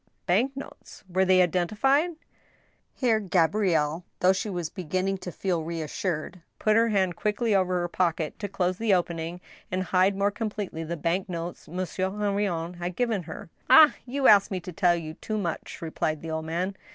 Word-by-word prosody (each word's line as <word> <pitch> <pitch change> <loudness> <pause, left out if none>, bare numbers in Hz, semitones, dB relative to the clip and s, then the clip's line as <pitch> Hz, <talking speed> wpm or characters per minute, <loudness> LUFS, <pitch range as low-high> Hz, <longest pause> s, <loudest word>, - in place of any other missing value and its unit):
" - - -47
Bank 240 +10 +1
notes! 275 - -10
Were 190 +1 +1
they 185 -1 +5
identified? 270 - +1 0.4
" - - -40
Here 235 -4 +2
Gabrielle, 175 -4 +1 0.2
though 185 +1 +5
she 190 +3 -3
was 175 -4 -3
beginning 185 +2 -2
to 180 - -6
feel 175 -1 -1
reassured, 165 +1 -4 0.2
put 215 0 +2
her 230 +1 +4
hand 190 -4 +1
quickly 215 +1 0
over 185 -2 +2
her 175 - -1
pocket 170 -3 -1
to 205 - -3
close 185 -2 -1
the 220 -4 +3
opening 170 0 -3 0.3
and 185 +1 0
hide 185 +2 +2
more 200 +1 +2
completely 205 -6 -4
the 170 +2 -4
bank 175 +4 -1
notes 170 0 -5
Monsieur 185 +2 -2
Henrion 200 -4 -2
had 175 0 -4
given 235 -5 0
her. 165 - -9
" - - -38
Ah! 290 +3 +9
you 270 +2 -2
ask 200 -2 +7
me 190 - -2
to 180 - -7
tell 175 0 +3
you 160 -2 -5
too 215 +6 -4
much," 170 -3 -4
replied 155 -1 -2
the 165 - -5
old 160 0 -3
man. 180 +4 -2
185 Hz, 190 wpm, -27 LUFS, 170-205 Hz, 0.4 s, Ah